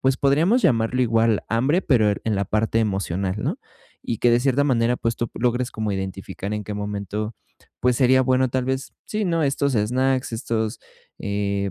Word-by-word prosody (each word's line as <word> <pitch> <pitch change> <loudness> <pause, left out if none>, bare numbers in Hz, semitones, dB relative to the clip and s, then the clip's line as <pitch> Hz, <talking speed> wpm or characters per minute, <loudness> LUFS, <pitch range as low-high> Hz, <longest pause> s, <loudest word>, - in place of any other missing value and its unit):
pues, 130 0 +2
podríamos 160 - +3
llamarlo 115 +1 +2
igual 115 -2 +2
hambre 135 +11 +2
pero 115 - +3
er 100 - -2
en 110 - 0
la 100 0 0
parte 110 +3 0
emocional, 95 -2 -1
¿no? - - -2 0.4
Y 115 - -3
que 120 - +3
de 120 - +4
cierta 135 +2 +2
manera, 120 -3 +2
pues, 115 -1 -1
tú 120 - -3
logres 125 +1 0
como 110 -2 -3
identificar 95 +1 -5
en 105 -1 -3
qué 105 +1 -5
momento, 105 +1 -4 0.4
pues, 125 0 +2
sería 130 +1 +4
bueno 130 0 +2
tal 130 +1 -1
vez, 130 +1 -3
sí, 215 -1 -2
¿no?, 165 -3 +1
estos 140 -1 0
snacks, 130 +4 +1
estos, 110 0 -2 0.4
eh, 100 -1 -1
115 Hz, 185 wpm, -23 LUFS, 105-130 Hz, 0.4 s, de